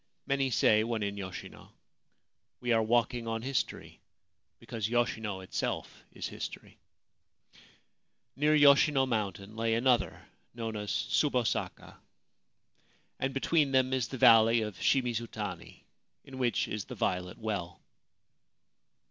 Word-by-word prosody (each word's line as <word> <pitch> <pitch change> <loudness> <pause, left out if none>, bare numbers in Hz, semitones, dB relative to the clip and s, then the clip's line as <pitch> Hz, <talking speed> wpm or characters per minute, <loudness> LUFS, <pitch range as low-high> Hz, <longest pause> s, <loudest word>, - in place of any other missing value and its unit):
Many 135 -1 0
say, 110 -2 +4
when 115 -2 -2
in 100 0 -3
Yoshino, 95 -3 -8 0.5
' - - -52
We 120 -1 -2
are 115 -1 +4
walking 120 +1 +1
on 115 0 -3
history, 135 -1 -3 0.6
because 110 -2 -4
Yoshino 110 -4 -1
itself 95 - -4
is - - -5
history/ - - -8 1.6
Near 150 +2 +3
Yoshino 140 -1 +5
mountain 105 -4 -3
lay 115 0 0
another, 125 +1 +1 0.3
known 115 -2 -4
as 105 -1 -5
Tsubosaka; 125 -6 -1 1.2
and 135 - -1
between 140 +1 +1
them 130 0 +3
is 130 -4 0
the 130 - -6
Valley 115 -2 +6
of 105 -4 -5
Shimizutani, 110 -9 -2 0.4
in 130 -1 -10
which 120 -2 +1
is 105 -2 -4
the - - -8
Violet 90 -1 -2
Well. 100 -6 -4
115 Hz, 120 wpm, -30 LUFS, 105-130 Hz, 1.6 s, Valley